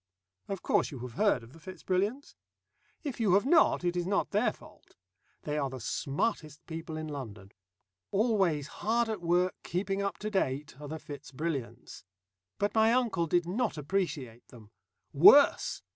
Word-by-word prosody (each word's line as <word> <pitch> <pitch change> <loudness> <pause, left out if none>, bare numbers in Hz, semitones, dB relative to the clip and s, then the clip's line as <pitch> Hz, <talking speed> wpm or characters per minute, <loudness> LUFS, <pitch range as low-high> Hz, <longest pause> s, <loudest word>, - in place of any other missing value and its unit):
Of 195 -2 -5
course - - +2
you 140 - -8
have 125 - -9
heard 200 - +2
of 115 +3 -15
the 165 - -15
Fitz 185 +4 -11
Brilliants? 205 +9 -1 0.7
If 280 -6 -5
you 205 -5 +3
have 205 - +3
not, 315 - +4
it 175 0 0
is 175 0 -1
not 200 +1 0
their 215 +2 +2
fault. - - -18 0.5
They 150 0 -2
are 140 -2 -1
the 130 0 -7
smartest 150 - -3
people 160 -1 -6
in 155 0 -5
London. 110 -9 -8 0.6
Always 195 - +1
hard 225 +9 -1
at 215 -4 -3
work, 175 +2 +2
keeping 195 +3 -2
up 200 0 -2
to 215 0 -5
date, 150 -7 -1
are 145 - -7
the 160 +2 -5
Fitz 150 -3 -10
Brilliants. 140 -3 -5 0.5
But 205 - 0
my 220 0 +4
uncle 230 -9 +1
did 175 +2 +2
not 210 +1 -1
appreciate 145 -7 -3
them. 110 -4 -15 0.4
Worse! 230 - +6
175 Hz, 170 wpm, -30 LUFS, 145-205 Hz, 0.7 s, Worse